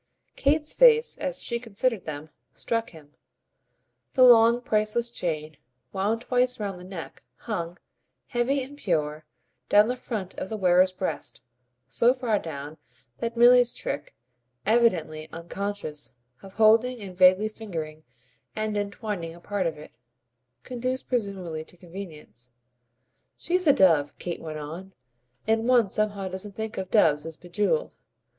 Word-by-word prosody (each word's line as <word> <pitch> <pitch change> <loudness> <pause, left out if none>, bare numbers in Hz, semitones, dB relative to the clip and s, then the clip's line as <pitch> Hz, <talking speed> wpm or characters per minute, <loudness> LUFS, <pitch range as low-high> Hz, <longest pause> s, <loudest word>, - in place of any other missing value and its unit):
Kate's 300 +2 +1
face, 475 -1 +5
as - - -1
she 235 -1 -1
considered 230 -2 -2
them, 155 0 -6 0.2
struck 230 -1 -2
him: 150 -3 -16 1.0
the 255 - +5
long, 235 -1 +7
priceless 230 0 0
chain, 155 -7 -3 0.4
wound 210 +4 0
twice 250 0 +1
round 200 -3 -4
the - - -11
neck, 185 -3 -8
hung, 175 -6 -5 0.5
heavy 260 +3 0
and 285 +3 -11
pure, 155 - -1 0.4
down 210 +1 +6
the 250 - -1
front 210 -7 -5
of 190 - -5
the 220 - -3
wearer's 185 -1 +4
breast 185 -7 -5 0.4
so 235 - +3
far 235 -5 0
down 150 -1 -7 0.4
that 230 0 -3
Milly's 245 0 +6
trick, - - -4 0.5
evidently 175 -9 +2
unconscious, 170 -5 -5 0.3
of 195 0 -13
holding 225 +3 +4
and 190 -3 -8
vaguely 185 +3 +5
fingering 165 -8 -6 0.5
and 215 -1 -2
entwining 200 -4 -4
a - - -14
part 195 0 -2
of 160 -2 -4
it, 150 -5 -13 0.7
conduced 255 +1 -4
presumably 195 -9 -2
to 180 - -10
convenience. 160 - -10 0.9
"She's 360 0 -1
a - - +9
dove," 160 - +3
Kate 175 -1 -5
went 155 -1 -6
on, 170 +6 -8 0.5
"and 225 +1 +1
one 240 -6 +4
somehow 205 -2 -1
doesn't 190 +2 -7
think 220 -2 -4
of 190 -1 -5
doves 155 -9 +4
as 160 -1 -7
bejewelled. 205 - -1
200 Hz, 140 wpm, -26 LUFS, 165-235 Hz, 1.0 s, a